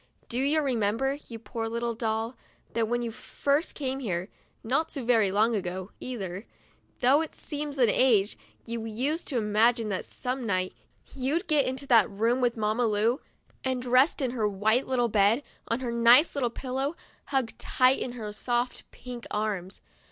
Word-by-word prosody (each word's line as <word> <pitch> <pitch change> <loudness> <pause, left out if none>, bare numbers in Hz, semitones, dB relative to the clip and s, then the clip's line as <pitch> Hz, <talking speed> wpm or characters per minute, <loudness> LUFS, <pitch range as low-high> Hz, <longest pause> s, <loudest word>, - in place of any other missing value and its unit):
Do 240 - -1
you 290 +4 +3
remember, 255 +2 0
you 230 - -7
poor 225 0 -4
little 235 +1 -2
doll, 225 +1 -2 0.4
that 225 -1 +1
when 240 +1 0
you 230 - -3
first 280 +6 -1
came 270 -2 -2
here, 185 -6 -3 0.3
not 275 +8 0
so 270 -5 -5
very 225 -5 +4
long 215 +4 +3
ago 185 -1 -3
either, 200 -5 -5 0.5
though 265 +5 +5
it 320 - -5
seems 295 -1 -4
an 245 -3 +5
age, 215 -3 +3 0.3
you 230 -1 -4
used 260 +9 -1
to 265 - -1
imagine 225 +1 +2
that 190 - -2
some 255 +1 -4
night 185 -4 0 0.4
you'd 280 +8 -1
get 295 -3 +3
into 260 +2 -3
that 230 -7 +5
room 230 +5 +1
with 240 -1 +1
Mamma 220 +2 +1
Lu, 220 +5 +1 0.4
and 255 -1 -1
rest 255 +5 +4
in 260 -3 0
her 220 -4 0
white 215 +6 +1
little 245 -2 +2
bed, 215 +4 +3 0.2
on 230 +3 -1
her 245 -2 -2
nice 235 +6 +6
little 265 -4 0
pillow, 265 +5 -3 0.3
hugged 265 -5 -1
tight 255 +1 +3
in 245 - -4
her 215 -4 -6
soft 240 +3 -2
pink 245 -2 -9
arms. 205 -3 -3
240 Hz, 175 wpm, -28 LUFS, 220-260 Hz, 0.5 s, nice